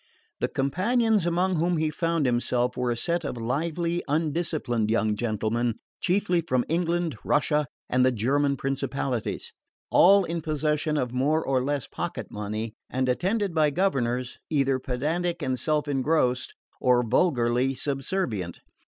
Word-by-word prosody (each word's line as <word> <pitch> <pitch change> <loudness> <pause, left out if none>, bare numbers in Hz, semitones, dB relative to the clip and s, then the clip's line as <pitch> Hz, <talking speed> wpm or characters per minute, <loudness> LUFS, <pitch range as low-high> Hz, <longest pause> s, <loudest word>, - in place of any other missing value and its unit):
The - - +1
companions 205 - +1
among 180 +1 +1
whom 170 +2 +1
he 155 0 0
found 165 -1 0
himself 125 0 +1
were 125 -1 -1
a 120 - -1
set 170 +6 0
of 135 - -4
lively 165 +8 -1
undisciplined 150 -7 0
young 110 -1 +2
gentlemen, 115 +1 -1 0.2
chiefly 180 -2 +1
from 130 -6 0
England, 170 0 0
Russia 150 0 +1 0.2
and 125 0 +2
the 130 - +4
German 140 +5 +1
principalities; 135 -2 -2 0.4
all 195 +2 +7
in 170 -1 -3
possession 155 0 0
of 125 -3 -1
more 150 +5 +1
or 130 -2 +1
less 145 -1 -1
pocket - - -5
money 105 +2 -4 0.2
and 130 0 -1
attended 190 - 0
by 155 -2 +3
governors 130 -8 -1
either 135 -3 +2
pedantic 160 +8 -2
and 130 -1 -1
self 150 +3 0
engrossed 135 -2 +1 0.2
or 125 -1 +3
vulgarly 125 -2 +2
subservient. 135 - -2
140 Hz, 140 wpm, -26 LUFS, 125-170 Hz, 0.4 s, all